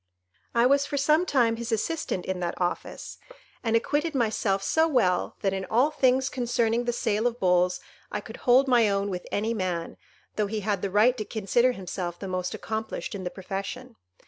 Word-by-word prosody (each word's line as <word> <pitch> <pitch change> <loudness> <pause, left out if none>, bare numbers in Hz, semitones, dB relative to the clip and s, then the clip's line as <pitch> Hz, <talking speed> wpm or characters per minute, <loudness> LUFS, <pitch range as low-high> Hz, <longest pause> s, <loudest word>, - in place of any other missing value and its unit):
I 235 +1 +5
was 280 +2 +3
for 285 - -3
some 305 +5 +3
time 235 -4 +2
his 235 0 -5
assistant 225 - -2
in 190 -1 -2
that 175 -1 -3
office, 175 -1 -4 0.4
and 225 -1 +1
acquitted 295 +6 0
myself 215 -5 +1
so 320 +9 +3
well, 220 - +1
that 195 -2 +1
in 190 0 -2
all 245 +10 +2
things 260 -2 +2
concerning 240 -2 0
the 240 - +1
sale 225 -1 0
of 240 0 -3
bulls 180 -1 +2 0.3
I 210 - -2
could 220 +3 -10
hold 255 +2 +4
my 240 -4 +4
own 200 0 0
with 180 -1 -5
any 220 +3 0
man, 180 -5 -3 0.4
though 210 -1 +1
he 215 +1 -3
had 200 -2 -1
the 200 - -1
right 215 +6 +4
to - - -1
consider 235 +5 +1
himself 180 -3 -5
the 195 - -6
most 185 -1 -2
accomplished 220 +1 -4
in 190 -2 -5
the - - -1
profession. 200 +7 -6
220 Hz, 195 wpm, -26 LUFS, 195-250 Hz, 0.4 s, I